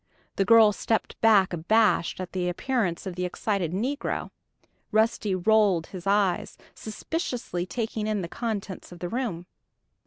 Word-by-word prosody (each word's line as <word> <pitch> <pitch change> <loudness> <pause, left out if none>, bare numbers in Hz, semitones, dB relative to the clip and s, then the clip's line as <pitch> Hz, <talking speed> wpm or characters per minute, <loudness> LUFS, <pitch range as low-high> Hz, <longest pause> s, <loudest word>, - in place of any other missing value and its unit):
The 195 - +2
girl 225 -1 +7
stepped 220 +2 -2
back 205 -5 +5
abashed 195 +2 +2
at 185 -1 -5
the 180 -1 -1
appearance 200 -2 -1
of 190 - -4
the 180 - -3
excited 180 -1 -1
negro. 250 - -2 0.6
Rusty 215 -2 +2
rolled 195 -3 +3
his 185 0 -7
eyes, 200 -3 +1 0.2
suspiciously 220 - -4
taking 220 -1 -3
in 215 -2 0
the - - -4
contents 205 -3 -5
of 175 - -10
the 175 +1 -5
room. 215 -7 -3
200 Hz, 145 wpm, -26 LUFS, 180-225 Hz, 0.6 s, girl